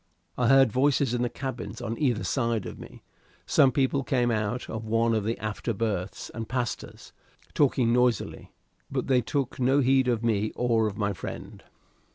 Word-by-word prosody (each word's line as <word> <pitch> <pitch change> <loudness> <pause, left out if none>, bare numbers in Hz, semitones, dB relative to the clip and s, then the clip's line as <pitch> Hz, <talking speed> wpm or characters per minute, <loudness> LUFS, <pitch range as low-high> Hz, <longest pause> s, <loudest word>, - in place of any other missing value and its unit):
I 125 - +1
heard 135 -2 +6
voices 135 0 +2
in 120 - 0
the 120 - 0
cabins 130 0 -6
on 115 0 -3
either 125 -7 +1 0.2
hand 115 -3 0
of - - -8
me; - - -12 0.4
some 135 - +4
people 135 +1 +1
came 120 -2 +1
out 110 +2 -2
of 110 0 -5
one 115 +1 +2
of 110 -2 0
the 115 +2 -1
after 110 +1 -3
berths, 100 -3 -3
and 115 -1 -6
passed 125 -2 -2
us, - - -14 0.4
talking 125 -4 +2
noisily, 125 -3 0 0.4
but - - -2
they 130 -2 +3
took 135 +2 -3
no 130 +3 +3
heed 130 -1 +3
of 120 -2 0
me 110 -2 0
or 115 -3 +2
of 105 - -5
my 100 -2 0
friend. 90 - -8
120 Hz, 185 wpm, -27 LUFS, 110-130 Hz, 0.4 s, heard